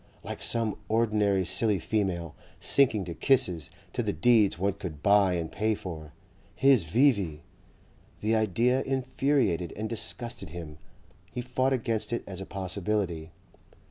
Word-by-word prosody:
Like - - -7
some 115 -3 0
ordinary 105 -4 +2
silly 100 +4 +2
female, 90 -4 -2 0.3
sinking 115 -8 +3
to 85 - -5
kisses, 90 - +2 0.2
to - - -1
the - - -1
deeds 105 +3 +3
one 100 +2 0
could 90 -7 -8
buy 100 -2 +5
and 85 -2 -3
pay 110 +1 0
for. 80 -6 -8 0.4
His 135 -9 +4
V.V.! 100 - +2 0.8
The 110 +2 +1
idea 115 +5 +2
infuriated 130 - 0
and 110 +1 -3
disgusted 115 -3 -4
him. 80 -2 -8 0.5
He 125 - -5
fought 130 +2 0
against 115 -3 -1
it 120 - -2
as 95 -1 -7
a 95 - -7
possibility. 95 -3 -2
100 Hz, 140 wpm, -28 LUFS, 90-115 Hz, 0.8 s, buy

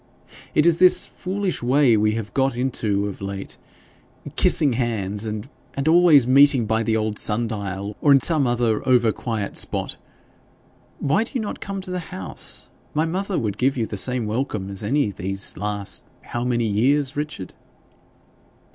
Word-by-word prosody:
It 150 - +4
is 170 -1 +4
this 185 -1 +5
foolish 190 0 -3
way 125 0 +4
we 105 0 +2
have 110 -2 -5
got 135 -2 +1
into 110 -6 0
of 100 - -8
late 100 0 -6 0.8
kissing 145 -5 +2
hands 110 -4 -2
and 105 +1 -5 0.3
and 140 +2 -2
always 160 -5 +6
meeting 135 -1 +5
by 110 +1 0
the 110 0 +1
old 110 -1 -2
sun 115 +2 +1
dial, 100 -1 -5
or 145 - +4
in 135 - +7
some 145 0 +3
other 120 -3 +1
over 120 -3 +4
quiet 110 -3 -4
spot. - - 0 1.0
Why 155 +10 +1
do 230 - -3
you - - +1
not 210 - -5
come 195 -1 -5
to 185 -1 -8
the 180 - -2
house? 95 -1 -5 0.3
My 155 +2 +2
mother 190 +3 -2
would 105 -3 -2
give 135 +1 +1
you 115 - 0
the 105 - -6
same 125 +3 0
welcome 105 -3 -3
as 100 - -6
any 110 +1 0
time 90 - -11
these 95 +1 -1
last 100 -1 -2 0.2
how 120 - -4
many 120 -2 0
years, 130 +7 +1
Richard?' 150 -10 -5
120 Hz, 175 wpm, -22 LUFS, 105-145 Hz, 1.0 s, in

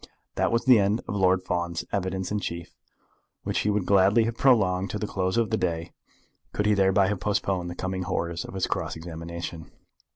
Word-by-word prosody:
That - - 0
was 115 0 +1
the 125 -4 +7
end 100 +3 +1
of - - -3
Lord 95 -1 +3
Fawn's 85 -2 -2
evidence 95 -1 -2
in 105 - 0
chief, 85 -4 -6 0.7
which - - -1
he 105 - 0
would 105 -3 0
gladly 100 +4 +4
have 115 +1 -2
prolonged 95 -8 +3
to - - -3
the 105 - -3
close 95 0 -1
of 115 -1 +1
the 110 - +2
day 85 -2 -2 0.6
could 105 - -1
he 105 - +4
thereby 95 0 +4
have 105 -2 -1
postponed 95 -2 -1
the 85 - -6
coming 95 +1 -3
horrors 85 -1 -2
of - - -9
his 95 - 0
cross - - -3
examination. 85 0 -7
95 Hz, 200 wpm, -26 LUFS, 90-105 Hz, 0.7 s, the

